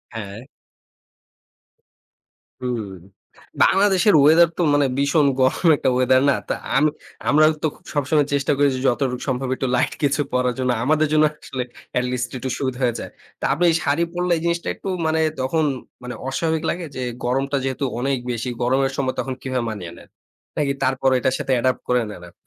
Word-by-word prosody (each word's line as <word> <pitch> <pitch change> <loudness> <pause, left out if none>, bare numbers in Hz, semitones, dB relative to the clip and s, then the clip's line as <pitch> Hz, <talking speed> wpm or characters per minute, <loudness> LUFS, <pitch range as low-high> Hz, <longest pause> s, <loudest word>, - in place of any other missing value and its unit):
হ্যাঁ। 105 0 -6 2.2
হুম, 120 -5 -3 0.7
বাংলাদেশের 195 0 +4
ওয়েদার 160 +4 +6
তো - - 0
মানে 145 -1 +3
ভীষণ 140 +1 +3
গরম 130 +7 +2
একটা - - +1
ওয়েদার 130 +1 +4
না। - - +4 0.2
তা - - +2 0.2
আমি 150 +2 +4 0.4
আমরা 155 +2 +5 0.2
তো - - +3 0.3
সবসময় 145 0 +1
চেষ্টা 140 0 +1
করেছি 140 -2 +2
যতটুক 125 0 0
সম্ভব 130 0 -1
একটু 130 - -2
লাইট 125 - +1
কিছু 140 +1 +2
পড়ার 125 -1 +1
জন্য। 125 -1 +1
আমাদের 155 +1 +3
জন্য 155 0 +5 0.2
আসলে 130 -1 -4 0.3
এটলিস্ট 125 0 -1
একটু 130 +1 -4
সুবিধা 130 -2 -3
হয়ে 120 -2 +1
যায়। - - -7 0.3
তো - - -11
আপনি 160 +5 -1
এই - - +1
শাড়ি 145 +4 +1
পড়লে 180 0 -1
এই - - -5
জিনিসটা 170 0 -1
একটু - - -9 0.2
মানে 160 0 +1 0.2
তখন 155 +5 0 0.4
মানে 125 0 -6
অস্বাভাবিক 160 +3 -1
লাগে 175 -1 -3
যে 130 - -4 0.2
গরমটা 135 +3 0
যেহেতু 135 +1 -2 0.2
অনেক 135 +1 0
বেশি 120 +1 -3
গরমের 135 +2 +2
সময় 130 -2 0
তখন 130 - -2
কিভাবে 130 -2 -2
মানিয়ে 95 -6 -6
নেন? - - -15 0.5
নাকি 140 -2 +1
তারপরেও 130 0 +2
এটার 130 +1 +1
সাথে - - -2
অ্যাডপ্ট 130 +1 0
করে 125 0 +3
নেন 90 -4 -9
আপনি? - - -22
135 Hz, 175 wpm, -21 LUFS, 125-150 Hz, 2.2 s, ওয়েদার